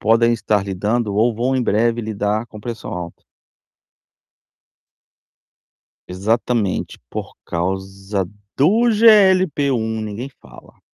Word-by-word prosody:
podem 115 +2 +4
estar 105 -3 0
lidando 105 +3 -1
ou 115 +3 +3
vão 125 +4 0
em 130 - +1
breve 115 +2 +1
lidar 110 0 -2
com 105 - -12
pressão 115 0 -6
alta. 85 -1 -7 2.9
Exatamente 105 +2 -1
por - - -6
causa 95 +2 -3 0.3
do 190 - +4
GLP1, 185 - +4
ninguém 110 +5 -5
fala. 60 -3 -16
110 Hz, 100 wpm, -20 LUFS, 100-120 Hz, 2.9 s, podem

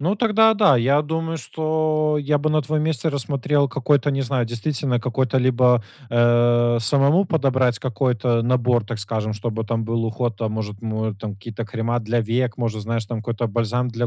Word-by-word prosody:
ну, 185 +8 0
тогда, 220 0 +4
да, 200 -10 +5
я 140 +5 +2
думаю, 160 +1 -3
что 155 +2 0
я 145 +1 +1
бы 155 +2 0
на 155 -1 +2
твоем 150 +2 -1
месте 160 -1 0
рассмотрел 140 0 0
какой-то, 140 +1 +1
не 135 0 -1
знаю, 125 -2 -1
действительно 125 +2 -1
какой-то 125 +1 -1
либо, 125 -1 +3 0.3
э, 120 0 +3
самому 140 - +3
подобрать 130 -7 +1
какой-то 120 -1 0
набор, 120 -2 +1
так 115 -1 -5
скажем, 110 +1 -3
чтобы 115 +1 -4
там 115 0 -2
был 115 0 -1
уход. 115 0 -2
Там, 110 0 -3
может, 105 -2 -5
му 110 0 -2
э, 110 - -4
там 105 -2 -5
какие-то 115 +3 -7
крема 115 +3 -2
для 115 +2 -1
век, 120 +2 -1
может, 110 -3 -2
знаешь, 115 +1 -2
там 115 0 -4
какой-то 115 +1 -2
бальзам 120 +3 -1
для 120 0 -2
120 Hz, 190 wpm, -21 LUFS, 115-145 Hz, 0.3 s, да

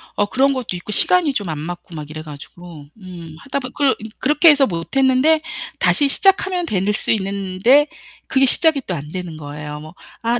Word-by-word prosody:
어 205 - +2
그런 270 +5 +2
것도 255 -8 -4
있고 175 +4 -8
시간이 330 - +4
좀 205 -7 -2
안 155 - -5
맞고 175 +2 -8
막 150 -1 -7
이래 155 0 -7
가지고 155 +1 -12
음 175 -5 -11
하다 280 0 -3
보 255 - -7
그 280 -2 +2 0.3
그렇게 300 +4 +3
해서 285 -3 +5
못 170 +5 -6
했는데 270 +4 +3 0.4
다시 290 - +3
시작하면 380 +2 +1
될 200 - -1
수 215 - -1
있는데 200 +7 +2 0.4
그게 270 0 +3
시작이 305 +2 +2
또 185 - -2
안 150 0 -8
되는 180 -3 -6
거예요. 150 0 -8
뭐 155 +2 -12 0.3
'아 235 +1 0
205 Hz, 340 characters per minute, -19 LUFS, 165-275 Hz, 0.4 s, 해서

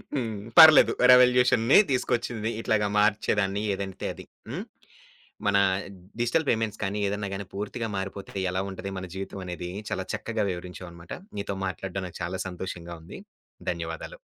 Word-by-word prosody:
హ్మ్. 115 -6 -2 0.2
పర్లేదు 155 -1 +10 0.2
రివల్యూషన్‌ని 125 -1 +6
తీసుకొచ్చింది. 120 -3 -1
ఇట్లాగా 105 -2 +1
మార్చేదాన్ని 105 -1 +1
ఏదంటే 95 -1 -5
అది. - - -11 0.2
హ్మ్. - - -4 0.8
మన 100 0 +3 0.6
డిజిటల్ 140 +7 +1
పేమెంట్స్ 110 -2 -1
కాని, 100 +2 -2
ఏదైనా 100 0 -3
గాని 100 0 -5
పూర్తిగా 105 +4 -4
మారిపోతే 95 0 -6 0.2
ఎలా 95 - -1
ఉంటది 95 +1 -6
మన 95 - -5
జీవితం 95 0 -6
అనేది. 90 0 -5 0.2
చాలా 95 - -2
చక్కగా 110 0 -2
వివరించావనమాట. 90 -1 -8 0.3
నీతో 100 -1 -3
మాట్లాడడం 95 0 -4
నాకు 85 - -11
చాలా 90 +2 -3
సంతోషంగా 90 -2 -6
ఉంది. 85 - -10 0.5
ధన్యవాదాలు. - - -5
100 Hz, 135 wpm, -27 LUFS, 95-115 Hz, 0.8 s, పర్లేదు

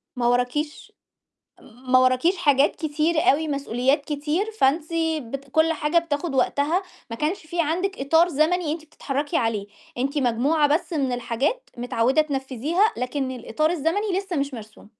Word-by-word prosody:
ما 245 -1 0
وراكيش 250 +5 -1 0.7
ما 255 +2 0
وراكيش 255 +9 +3
حاجات 285 -3 +3
كتير 315 +1 -1
أوي 315 +1 +2
مسؤوليات 280 0 0
كتير، 300 +8 -2
فأنتِ 305 +4 +2 0.3
بت 275 +3 -8
كل 315 +2 +3
حاجة 300 +2 0
بتاخُد 330 -2 -1
وقتها 285 +7 +1 0.3
ما 230 - -4
كانش 305 +9 -1
في 335 +2 -2
عندِك 360 +4 -1
إطار 320 +5 +4
زمني 320 +1 +1
أنتِ 315 -1 -8
بتتحرّكي 285 -1 -3
عليه، 215 -3 -1 0.3
أنتِ 275 +4 -1
مجموعة 280 +5 +2
بس 315 +4 0
من 275 -5 0
الحاجات 245 - -2
متعوِّدة 245 +3 +2
تنفِّذيها، 285 - 0
لكن 260 +2 -2
الإطار 255 +5 -1
الزمني 355 +5 0
لسّه 390 -3 -5
مش 280 -1 -1
مرسوم. 215 -3 -11
290 Hz, 150 wpm, -24 LUFS, 255-325 Hz, 0.7 s, إطار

